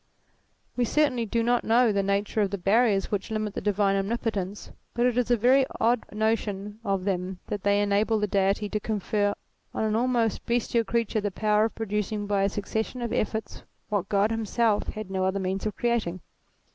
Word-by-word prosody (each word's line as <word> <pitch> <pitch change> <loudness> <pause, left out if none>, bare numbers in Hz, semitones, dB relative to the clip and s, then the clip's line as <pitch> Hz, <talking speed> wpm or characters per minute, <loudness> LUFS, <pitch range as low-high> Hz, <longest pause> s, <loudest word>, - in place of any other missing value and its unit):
"We 245 - +1
certainly 250 -2 +1
do 230 +2 0
not 240 +1 +2
know 235 0 +4
the 200 -1 +1
nature 200 +2 0
of 200 - +1
the 200 - -3
barriers 200 +1 +2
which 205 +1 -2
limit 215 -2 -2
the - - -4
divine 200 -1 +2
omnipotence; 200 -1 -2 0.2
but 240 +1 +2
it 250 -2 +2
is 245 -1 +1
a 240 - +4
very 255 +5 +5 0.2
odd 235 0 +2
notion 210 -1 -1
of 195 -3 -1
them 185 -1 -2
that 205 - -3
they 200 +1 +2
enable 205 +2 +2
the 210 - +1
Deity 200 +1 +1
to 215 - -1
confer 205 -1 -1 0.4
on - - 0
an 215 0 +1
almost 235 -2 +1
bestial 235 -1 +1
creature 230 0 0
the 205 - -1
power 210 +2 +2
of 225 - -4
producing 210 -1 -2
by 200 -1 +1
a 195 - +2
succession 220 +5 -3
of 235 - -3
efforts 220 +1 -2 0.3
what 200 -3 -1
God 205 +2 +2
him 225 0 -1
self 220 -1 +1
had 215 -3 -6
no 190 -1 -1
other 190 +1 0
means 190 +2 -2
of 210 - -4
creating. 225 -7 -1
210 Hz, 195 wpm, -26 LUFS, 200-230 Hz, 0.4 s, very